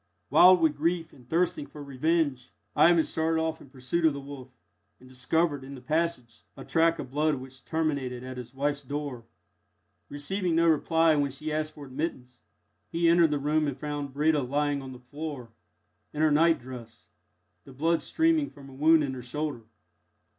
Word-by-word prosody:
Wild 180 Hz, +4 st, +7 dB
with 160 Hz, -2 st, +3 dB
grief 165 Hz, +1 st, -1 dB
and 125 Hz, -3 st, -18 dB
thirsting 165 Hz, -3 st, 0 dB
for 150 Hz, -, -10 dB
revenge, 140 Hz, -1 st, 0 dB, 0.3 s
Ivan 170 Hz, -1 st, +5 dB
started 160 Hz, +1 st, 0 dB
off 160 Hz, 0 st, -2 dB
in -, -, -14 dB
pursuit 130 Hz, +5 st, -3 dB
of 160 Hz, -2 st, +4 dB
the 140 Hz, -, -5 dB
wolf, 135 Hz, -2 st, -9 dB, 0.5 s
and 130 Hz, -, -16 dB
discovered, 140 Hz, +3 st, 0 dB
in 135 Hz, +1 st, -9 dB
the -, -, -9 dB
passage, 150 Hz, -5 st, -2 dB, 0.2 s
a -, -, -9 dB
track 165 Hz, 0 st, +2 dB
of 130 Hz, -, -7 dB
blood 150 Hz, +2 st, +1 dB
which 130 Hz, 0 st, -11 dB
terminated 140 Hz, -6 st, -2 dB
at 130 Hz, 0 st, -7 dB
his 125 Hz, +1 st, -9 dB
wife's 145 Hz, +1 st, -1 dB
door. 140 Hz, -3 st, -5 dB, 0.8 s
Receiving 175 Hz, +4 st, -2 dB
no 165 Hz, +1 st, +3 dB
reply 165 Hz, 0 st, +3 dB
when 145 Hz, -1 st, +1 dB
he 150 Hz, +3 st, -5 dB
asked 155 Hz, 0 st, -2 dB
for 145 Hz, -, -9 dB
admittance, 130 Hz, -3 st, -5 dB, 0.5 s
he 170 Hz, 0 st, +1 dB
entered 170 Hz, -1 st, +5 dB
the 150 Hz, -, 0 dB
room 150 Hz, +2 st, +1 dB
and 140 Hz, -2 st, -3 dB
found 145 Hz, -1 st, -4 dB
Breda 150 Hz, +2 st, +2 dB
lying 145 Hz, +2 st, -1 dB
on 130 Hz, -1 st, -8 dB
the 130 Hz, -, -9 dB
floor, 130 Hz, -1 st, -7 dB, 0.6 s
in 150 Hz, +1 st, 0 dB
her 155 Hz, -, +4 dB
nightdress, 130 Hz, -7 st, 0 dB, 0.6 s
the 135 Hz, -, -12 dB
blood 160 Hz, +5 st, +1 dB
streaming 320 Hz, -, +1 dB
from 140 Hz, -1 st, -14 dB
a -, -, -13 dB
wound 155 Hz, +3 st, +4 dB
in 135 Hz, -2 st, -2 dB
her 130 Hz, -, -6 dB
shoulder. 125 Hz, -1 st, -4 dB
145 Hz, 180 wpm, -28 LUFS, 130-160 Hz, 0.8 s, Wild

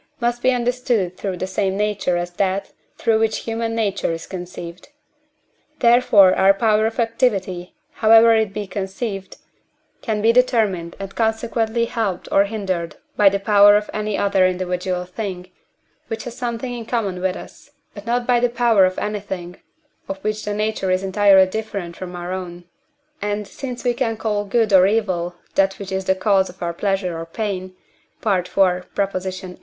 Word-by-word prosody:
must 240 Hz, 0 st, -1 dB
be 255 Hz, -, +3 dB
understood 245 Hz, -6 st, 0 dB
through 190 Hz, -1 st, -4 dB
the 185 Hz, -, -3 dB
same 190 Hz, 0 st, -1 dB
nature 205 Hz, -4 st, 0 dB
as 175 Hz, 0 st, -3 dB
that, 190 Hz, +2 st, -1 dB, 0.3 s
through 225 Hz, -1 st, +2 dB
which 220 Hz, -1 st, 0 dB
human 225 Hz, 0 st, -2 dB
nature 210 Hz, -6 st, -1 dB
is 165 Hz, 0 st, -5 dB
conceived. 175 Hz, 0 st, -8 dB, 0.9 s
Therefore 235 Hz, -6 st, +5 dB
our 195 Hz, +1 st, +4 dB
power 215 Hz, +1 st, +2 dB
of 225 Hz, -, -5 dB
activity, 195 Hz, -7 st, -1 dB, 0.3 s
however 225 Hz, +1 st, +7 dB
it 220 Hz, -3 st, +1 dB
be 210 Hz, +1 st, -4 dB
conceived, 195 Hz, +1 st, -5 dB, 0.6 s
can 220 Hz, -4 st, -2 dB
be 225 Hz, +2 st, +4 dB
determined 220 Hz, -9 st, +1 dB
and 195 Hz, 0 st, -7 dB
consequently 225 Hz, 0 st, 0 dB
helped 210 Hz, -6 st, -3 dB
or 200 Hz, -, +4 dB
hindered 190 Hz, -6 st, -3 dB, 0.2 s
by 205 Hz, -2 st, +6 dB
the 200 Hz, +1 st, -1 dB
power 205 Hz, 0 st, +6 dB
of 210 Hz, 0 st, -4 dB
any 210 Hz, -1 st, -2 dB
other 195 Hz, -2 st, +3 dB
individual 180 Hz, 0 st, -2 dB
thing, 185 Hz, -1 st, -6 dB, 0.6 s
which 225 Hz, -1 st, -5 dB
has 240 Hz, -1 st, -7 dB
something 245 Hz, 0 st, -4 dB
in 235 Hz, -2 st, -7 dB
common 200 Hz, -7 st, -2 dB
with 185 Hz, 0 st, 0 dB
us, -, -, -12 dB, 0.2 s
but 205 Hz, +2 st, -11 dB
not 240 Hz, +1 st, 0 dB
by 245 Hz, -1 st, +3 dB
the 245 Hz, 0 st, +2 dB
power 235 Hz, -5 st, +4 dB
of 185 Hz, 0 st, -1 dB
anything, 190 Hz, -4 st, -4 dB, 0.5 s
of 195 Hz, -, -3 dB
which 215 Hz, 0 st, -2 dB
the 210 Hz, -, -2 dB
nature 210 Hz, -2 st, -1 dB
is 185 Hz, +1 st, +1 dB
entirely 195 Hz, -1 st, +5 dB
different 200 Hz, -4 st, -5 dB
from 180 Hz, -1 st, -7 dB
our 175 Hz, +1 st, -5 dB
own; 175 Hz, -2 st, -6 dB, 0.6 s
and 205 Hz, 0 st, -2 dB
since 250 Hz, +2 st, -7 dB
we 245 Hz, -1 st, +2 dB
call 225 Hz, -4 st, -1 dB
good 215 Hz, 0 st, +1 dB
or 185 Hz, 0 st, +7 dB
evil 185 Hz, -5 st, -1 dB, 0.2 s
that 195 Hz, 0 st, +2 dB
which 195 Hz, -1 st, -8 dB
is 190 Hz, 0 st, -2 dB
the 190 Hz, -, +2 dB
cause 190 Hz, -1 st, +2 dB
of 180 Hz, -, -13 dB, 0.2 s
pleasure 195 Hz, -3 st, -1 dB
or 165 Hz, -, -5 dB
pain 185 Hz, -1 st, -4 dB, 0.5 s
(IV. 185 Hz, -4 st, +1 dB
viii.) 185 Hz, 0 st, -1 dB
200 Hz, 165 wpm, -21 LUFS, 185-225 Hz, 0.9 s, however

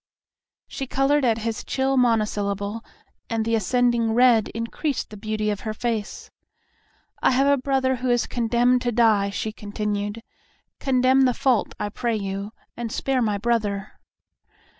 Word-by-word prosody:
She 270 Hz, -, -5 dB
colored 275 Hz, +3 st, +2 dB
at 230 Hz, -3 st, +2 dB
his 225 Hz, 0 st, -3 dB
chill 270 Hz, 0 st, 0 dB
monosyllable 210 Hz, -3 st, 0 dB, 0.5 s
and 225 Hz, -1 st, -1 dB
the 230 Hz, -, 0 dB
ascending 230 Hz, +1 st, +2 dB
red 240 Hz, -3 st, +5 dB
increased 230 Hz, +5 st, -3 dB
the -, -, -8 dB
beauty 215 Hz, 0 st, -2 dB
of 205 Hz, -, -3 dB
her 215 Hz, -2 st, -5 dB
face. 225 Hz, -2 st, -4 dB, 0.9 s
"I -, -, +4 dB
have 265 Hz, +2 st, +3 dB
a 280 Hz, -2 st, +3 dB
brother 260 Hz, -1 st, +1 dB
who 250 Hz, +1 st, -2 dB
is 240 Hz, 0 st, +2 dB
condemned 245 Hz, +1 st, +2 dB
to 245 Hz, -, 0 dB
die," 215 Hz, -4 st, +3 dB
she 215 Hz, +2 st, -3 dB
continued. 210 Hz, +1 st, -4 dB, 0.6 s
"Condemn 260 Hz, 0 st, +3 dB
the 250 Hz, -2 st, +2 dB
fault, 260 Hz, -5 st, +1 dB
I 205 Hz, -, -2 dB
pray 235 Hz, +2 st, -2 dB
you, 200 Hz, 0 st, -4 dB, 0.2 s
and 235 Hz, -2 st, -5 dB
spare 265 Hz, +1 st, 0 dB
my 210 Hz, -3 st, +1 dB
brother." 205 Hz, -3 st, -1 dB
230 Hz, 150 wpm, -23 LUFS, 210-250 Hz, 0.9 s, red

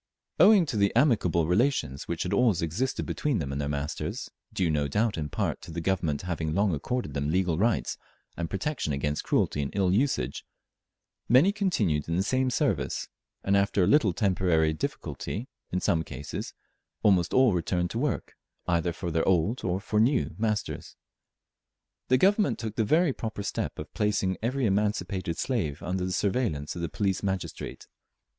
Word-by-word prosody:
Owing 205 Hz, -5 st, +7 dB
to 115 Hz, -, -3 dB
the 100 Hz, -1 st, +3 dB
amicable 105 Hz, -, +3 dB
relations 90 Hz, -, +1 dB
which 85 Hz, -2 st, -2 dB
had 90 Hz, +2 st, -2 dB
always 100 Hz, -6 st, +3 dB
existed 105 Hz, +12 st, -1 dB
between 145 Hz, -6 st, -1 dB
them 70 Hz, -5 st, -3 dB
and 70 Hz, +1 st, -2 dB
their 70 Hz, -, -2 dB
masters, 70 Hz, 0 st, -4 dB, 0.2 s
due 90 Hz, -, 0 dB
no 75 Hz, -1 st, +1 dB
doubt 105 Hz, +9 st, +1 dB
in 75 Hz, -2 st, -3 dB
part -, -, -2 dB
to 80 Hz, -, -11 dB
the 85 Hz, -, -4 dB
Government 85 Hz, -4 st, -1 dB
having 80 Hz, -3 st, -2 dB
long 100 Hz, -2 st, +2 dB
accorded 80 Hz, -, -3 dB
them 70 Hz, +1 st, -1 dB
legal 90 Hz, -1 st, +1 dB
rights 115 Hz, +2 st, +1 dB, 0.4 s
and 85 Hz, -1 st, -3 dB
protection 100 Hz, -, -2 dB
against 75 Hz, +2 st, -1 dB
cruelty 75 Hz, -, +1 dB
and 70 Hz, -, -3 dB
ill 95 Hz, -2 st, +2 dB
usage, 100 Hz, -, 0 dB, 0.9 s
many 135 Hz, -, +6 dB
continued 110 Hz, -, 0 dB
in 85 Hz, -, 0 dB
the 95 Hz, -, +2 dB
same 130 Hz, +4 st, +1 dB
service, -, -, -1 dB, 0.3 s
and 100 Hz, -, +2 dB
after 100 Hz, -1 st, +2 dB
a -, -, +3 dB
little 135 Hz, -10 st, +4 dB
temporary 90 Hz, -5 st, +2 dB
difficulty 105 Hz, -, -4 dB, 0.2 s
in 90 Hz, -, 0 dB
some 80 Hz, -2 st, +1 dB
cases, 70 Hz, -2 st, -6 dB, 0.5 s
almost 90 Hz, -5 st, +4 dB
all 130 Hz, -5 st, +5 dB
returned 90 Hz, 0 st, 0 dB
to 115 Hz, -, -2 dB
work 135 Hz, -4 st, -2 dB, 0.3 s
either 85 Hz, -1 st, +1 dB
for 85 Hz, +1 st, -4 dB
their 80 Hz, 0 st, 0 dB
old 95 Hz, +6 st, +2 dB
or 90 Hz, 0 st, 0 dB
for 105 Hz, +1 st, -1 dB
new, 125 Hz, 0 st, +2 dB
masters. 105 Hz, -2 st, -2 dB, 1.1 s
The 130 Hz, -, +4 dB
Government 200 Hz, -, +3 dB
took 110 Hz, -2 st, -5 dB
the 110 Hz, -, +2 dB
very 155 Hz, -, +3 dB
proper 110 Hz, -4 st, -5 dB
step -, -, -3 dB
of -, -, -8 dB
placing 100 Hz, -3 st, 0 dB
every 130 Hz, +3 st, 0 dB
emancipated 100 Hz, -4 st, 0 dB
slave 85 Hz, -, -2 dB
under 90 Hz, 0 st, -1 dB
the 95 Hz, -, -2 dB
surveillance 95 Hz, -, -1 dB
of 85 Hz, -, -5 dB
the 85 Hz, -, -2 dB
police 95 Hz, -3 st, -1 dB
magistrate. 95 Hz, -2 st, -4 dB
95 Hz, 175 wpm, -28 LUFS, 80-115 Hz, 1.1 s, Owing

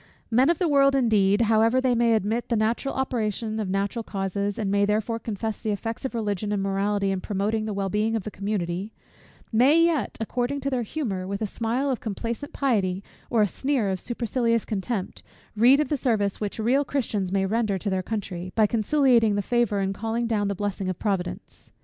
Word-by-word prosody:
Men 255 Hz, +6 st, +4 dB
of 340 Hz, -, +3 dB
the 355 Hz, -, +1 dB
world, 275 Hz, -2 st, +4 dB
indeed, 215 Hz, -5 st, +3 dB
however 225 Hz, +2 st, +3 dB
they 260 Hz, -1 st, +2 dB
may 235 Hz, -1 st, +3 dB
admit 220 Hz, +3 st, -1 dB
the 235 Hz, -, +2 dB
natural 230 Hz, +5 st, 0 dB
operation 220 Hz, -4 st, -2 dB
of 205 Hz, -3 st, -2 dB
natural 200 Hz, +4 st, -1 dB
causes, 200 Hz, -1 st, -3 dB
and 205 Hz, -3 st, -1 dB
may 200 Hz, 0 st, +3 dB
therefore 215 Hz, +2 st, 0 dB
confess 220 Hz, 0 st, -4 dB
the 220 Hz, -, -2 dB
effects 225 Hz, +5 st, -3 dB
of 260 Hz, -, -3 dB
Religion 210 Hz, -2 st, -2 dB
and 200 Hz, -2 st, 0 dB
morality 195 Hz, 0 st, 0 dB
in 190 Hz, -1 st, -2 dB
promoting 210 Hz, +3 st, -1 dB
the 215 Hz, -, -3 dB
well 195 Hz, -1 st, -1 dB
being 215 Hz, +3 st, 0 dB
of 220 Hz, -, -2 dB
the 215 Hz, -, -6 dB
community; 195 Hz, 0 st, -3 dB, 0.6 s
may 260 Hz, +8 st, +5 dB
yet, 330 Hz, -4 st, +1 dB
according 245 Hz, +5 st, -2 dB
to 275 Hz, -, -2 dB
their 255 Hz, -2 st, 0 dB
humour, 210 Hz, -7 st, -3 dB
with 200 Hz, +1 st, -3 dB
a 220 Hz, -, -1 dB
smile 235 Hz, +6 st, -1 dB
of 255 Hz, -, -2 dB
complacent 230 Hz, +5 st, -4 dB
pity, 200 Hz, -8 st, 0 dB, 0.3 s
or 225 Hz, -3 st, +3 dB
a -, -, +2 dB
sneer 260 Hz, +1 st, -1 dB
of 190 Hz, -, -2 dB
supercilious 235 Hz, 0 st, 0 dB
contempt, 205 Hz, -1 st, -3 dB, 0.3 s
read 245 Hz, +6 st, +6 dB
of 300 Hz, -, 0 dB
the 295 Hz, -, 0 dB
service 215 Hz, -7 st, 0 dB
which 205 Hz, -1 st, -3 dB
real 245 Hz, +6 st, +2 dB
Christians 215 Hz, -10 st, -2 dB
may 195 Hz, 0 st, +1 dB
render 215 Hz, -1 st, 0 dB
to 200 Hz, +2 st, -3 dB
their 190 Hz, 0 st, 0 dB
country, 185 Hz, -3 st, -5 dB
by 220 Hz, -, +5 dB
conciliating 230 Hz, -1 st, +3 dB
the 205 Hz, -, 0 dB
favour 235 Hz, -4 st, +1 dB
and 195 Hz, 0 st, -1 dB
calling 225 Hz, +3 st, -2 dB
down 215 Hz, -3 st, 0 dB
the 200 Hz, -, -1 dB
blessing 195 Hz, -1 st, -3 dB
of 185 Hz, -, -3 dB
Providence. 195 Hz, -4 st, -4 dB
220 Hz, 205 wpm, -25 LUFS, 200-240 Hz, 0.6 s, read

